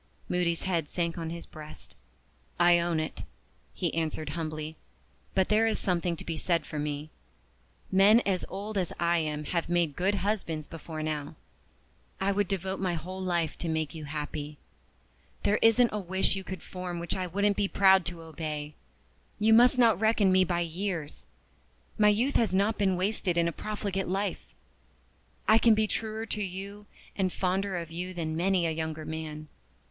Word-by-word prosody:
Moody's 175 -2 0
head 170 -6 -1
sank 170 -1 -2
on 165 -1 -3
his 170 0 -6
breast. 155 -1 -11 0.6
"I 175 0 +6
own 170 -1 0
it," 155 - -4 0.5
he - - -2
answered 155 -2 -2
humbly. 155 0 -4 0.6
"But 190 -1 +3
there 220 +1 +4
is 220 - +1
something 175 -2 0
to - - -8
be 165 -1 -3
said 170 -2 0
for 150 - -5
me. 150 +1 -3 0.8
Men 200 +4 +7
as 190 -5 0
old 205 +2 -3
as 180 - -1
I 170 0 +3
am 150 -1 -2
have 170 +2 -2
made 170 -4 +1
good 195 +3 +1
husbands 185 -6 -1
before 160 0 -7
now. 150 -2 -3 0.8
I 195 +1 +1
would 200 0 +1
devote 190 -1 -2
my 185 -2 0
whole 185 +4 -6
life 170 -4 0
to 170 - -2
make 160 -2 -1
you 155 -2 -7
happy. 150 0 -5 0.9
There 210 - +2
isn't 225 +1 +5
a 210 - -1
wish 190 0 0
you 190 - -4
could 190 -2 -7
form 180 -1 -5
which 170 0 -2
I 185 -1 -2
wouldn't 200 +3 +1
be 205 0 +1
proud 190 -1 +5
to 175 -2 -5
obey. 155 -2 -5 0.6
You 220 +1 +4
must 245 +3 +6
not 230 -5 +5
reckon 220 -3 +4
me 185 0 +5
by 175 -1 0
years. 170 -2 -4 0.7
My 210 0 +7
youth 235 +7 +2
has 220 -5 +2
not 205 +3 +2
been 190 -3 +2
wasted 185 -2 0
in 170 0 +3
a - - 0
profligate 200 -1 -3
life; 195 0 -1 1.1
I 220 - +7
can 230 -1 +6
be 215 0 +2
truer 220 +1 -3
to 210 -1 -3
you 200 +2 -6 0.3
and 190 -2 +1
fonder 190 +1 0
of 165 -1 -5
you 180 +2 -5
than 160 -2 -2
many 180 +1 +2
a 165 - +1
younger 160 -1 -4
man. 155 -1 -5
180 Hz, 180 wpm, -29 LUFS, 160-200 Hz, 1.1 s, Men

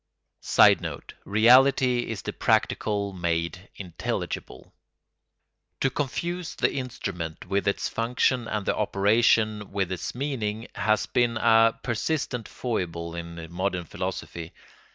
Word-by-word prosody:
[Sidenote: - - +3
Reality 125 +3 +5
is 110 -4 -4
the - - -4
practical 100 -2 0
made 85 +1 -2
intelligible.] 85 -7 -5 1.1
To 135 - +2
confuse 170 +6 -3
the - - +1
instrument 95 - -5
with 100 +2 -1
its 100 - 0
function 120 +1 0
and 105 -3 -2
the - - +1
operation 105 +1 +2
with 95 -2 -1
its 85 - -4
meaning 115 -5 -3
has 110 0 +1
been 120 -1 +1
a 115 0 +4
persistent 125 -1 -2
foible 85 -8 -3
in 85 -1 -7
modern 90 0 -2
philosophy. 85 +1 -5
105 Hz, 110 wpm, -26 LUFS, 90-120 Hz, 1.1 s, Reality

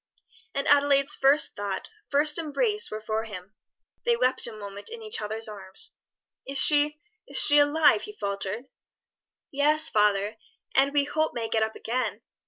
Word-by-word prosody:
And 275 - -1
Adelaide's 285 -1 +4
first 275 +3 +3
thought, 200 -2 -4 0.2
first 295 +2 +3
embrace, 420 - 0
were 215 - -6
for 220 +1 -2
him. 195 -2 -9 0.5
They 475 -1 +2
wept 255 - +1
a - - -6
moment 205 -2 -9
in 460 0 -9
each 430 - -3
other's 220 +1 -3
arms. 195 -3 -6 0.6
"Is 275 +1 -3
she 295 +2 +4 0.3
is - - -4
she 290 0 +6
alive?" 295 +5 +4
he 420 - -8
faltered. 200 +3 -4 0.9
"Yes, 300 +2 +2
father, 210 0 +2 0.4
and 275 +1 +3
we 285 0 +2
hope 310 +2 -1
may 230 -1 -2
get 220 - +1
up 220 0 -1
again. 230 -2 -3
270 Hz, 160 wpm, -26 LUFS, 215-295 Hz, 0.9 s, she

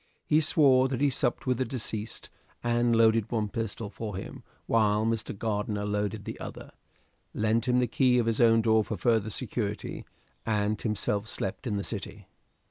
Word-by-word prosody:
He 155 +1 +3
swore 135 -4 +4
that 130 -2 -3
he 145 0 +3
supped 125 -2 -1
with 130 -2 0
the - - +3
deceased 115 -3 -5 0.3
and 120 0 +2
loaded 115 -1 +3
one 110 -3 0
pistol 110 -1 -4
for 105 -3 -5
him 95 - -7 0.2
while 110 -1 +2
Mr. 115 -3 -2
Gardiner 105 -1 -2
loaded 105 0 -2
the - - -6
other; - - -8 0.6
lent 110 +3 +1
him 125 0 +3
the 125 - +3
key 125 +1 +3
of 120 - +2
his 115 +1 +1
own 115 -1 +5
door 110 -1 +4
for - - -4
further 110 -3 +2
security, 105 -2 -3 0.4
and 105 -1 0
himself 105 -1 -1
slept 95 +2 -4
in 105 -3 -1
the 100 - -2
City. 100 -1 -6
110 Hz, 175 wpm, -28 LUFS, 105-120 Hz, 0.6 s, own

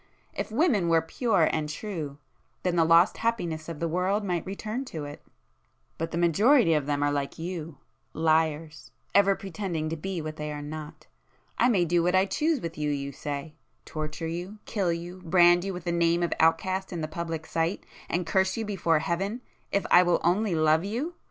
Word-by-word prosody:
If - - -4
women 225 - +2
were 165 -1 +4
pure 195 -1 +2
and 155 -1 -1
true, 155 -4 -5 0.5
then 180 -1 +1
the 165 - +4
lost 165 +3 +5
happiness 170 -9 -2
of 165 -3 -6
the 170 - 0
world 185 +5 0
might 180 -4 -1
return 215 +6 -4
to 155 - -6
it,—but 150 +2 -11
the 165 - -4
majority 180 - +4
of 150 -3 0
them 145 -1 0
are 145 - +2
like 140 -1 -2
you, 165 -2 -5 0.3
liars, 160 -1 0 0.2
ever 200 -1 +5
pretending 180 -5 -4
to 165 - -2
be 185 +3 -4
what 155 0 -5
they 150 0 -4
are 150 0 -5
not. 155 +1 -8 0.5
I 245 - +5
may 190 -7 +3
do 170 +1 +2
what 180 +2 +2
I 190 +1 +5
choose 300 +6 0
with 165 -2 -6
you, 150 0 0
you 140 -1 -2
say? 145 +2 -5 0.3
torture 155 +1 -5
you, 175 +5 -5
kill 195 -6 0
you, 175 +2 -6
brand 175 0 +5
you 195 - -2
with 180 -1 -6
the 175 - -1
name 170 0 +2
of 170 - 0
outcast 185 +4 +2
in 170 -3 -4
the 155 - -2
public 165 0 -4
sight, 165 +3 -1 0.2
and 175 +1 -1
curse 190 +5 +1
you 225 - -2
before 170 -6 +1
Heaven—if 195 +5 -3
I 180 - +9
will 175 -1 +2
only 185 +2 +2
love 155 +1 +3
you! 245 - -3
170 Hz, 190 wpm, -27 LUFS, 155-195 Hz, 0.5 s, I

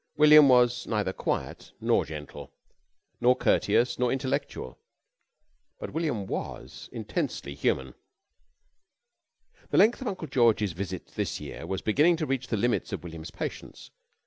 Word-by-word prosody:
William 150 -1 +8
was 125 -1 +3
neither 105 -4 -1
quiet - - -4
nor - - +2
gentle, 75 -2 -9 0.7
nor 125 +1 +4
courteous 125 0 +2
nor 125 -1 +2
intellectual 130 - -3 1.0
but - - -7
William 150 -11 -1
was - - -6
intensely 70 - -4
human. 65 -1 -1 1.8
The - - 0
length 220 +7 +5
of 260 - -4
Uncle 185 -5 -4
George's 115 -7 +2
visit 95 0 -6
this - - -3
year - - -8
was 95 - -3
beginning 150 +11 +4
to 160 - -2
reach 135 -3 -2
the 110 - -1
limits 120 +3 0
of 100 -5 -5
William's 80 -1 -8
patience. - - -7
120 Hz, 135 wpm, -27 LUFS, 95-140 Hz, 1.8 s, William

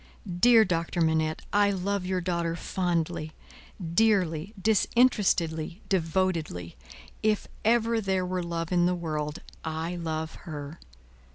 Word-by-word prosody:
Dear 230 0 +7
Doctor 170 -1 -1
Manette, 160 -1 +1
I 205 0 +4
love 195 0 -1
your 185 -1 0
daughter 170 -2 -1
fondly, 170 -3 -2 0.6
dearly, 185 -4 +2
disinterestedly, 195 -6 +2
devotedly. 165 - -1 0.5
If 215 -1 +1 0.2
ever 230 0 +3
there 190 -2 0
were 180 0 -2
love 170 -1 -3
in 175 -1 +3
the 180 - +1
world, 155 -3 -3 0.2
I 160 +2 -3
love 160 -1 -3 0.2
her. 145 +1 -7
175 Hz, 115 wpm, -28 LUFS, 160-195 Hz, 0.6 s, Dear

